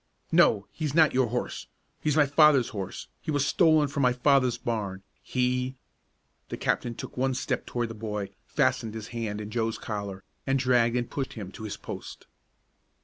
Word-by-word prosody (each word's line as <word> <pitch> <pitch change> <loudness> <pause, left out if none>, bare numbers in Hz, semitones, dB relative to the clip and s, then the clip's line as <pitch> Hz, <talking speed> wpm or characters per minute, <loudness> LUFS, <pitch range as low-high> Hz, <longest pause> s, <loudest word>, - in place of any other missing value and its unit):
"No, 100 -2 +5
he's 155 -3 -3
not 160 -2 +6
your 130 -1 +3
horse! 120 +2 -3 0.3
He's 150 0 0
my 150 - +6
father's 145 -3 +5
horse. 95 -3 -6
He - - -7
was 145 -2 +2
stolen 155 -2 +4
from 140 0 -2
my 125 -1 +4
father's 130 -1 +3
barn. 100 -5 -3 0.2
He 125 +1 0 0.4
" - - -45
The - - -4
captain 120 -1 -1
took - - -8
one 130 0 +1
step - - -2
toward 120 -1 -2
the - - -5
boy, 105 -2 -4 0.2
fastened 110 -1 +1
his 110 -1 -6
hand 115 -3 -3
in 105 0 -6
Joe's 115 -1 -1
collar, 100 -3 -5 0.2
and 135 0 +3
dragged 125 -2 +3
and 120 -1 -1
pushed 135 -2 -4
him 100 -4 -7
to 110 - -8
his 105 - -5
post. - - -8
120 Hz, 185 wpm, -28 LUFS, 110-135 Hz, 0.4 s, not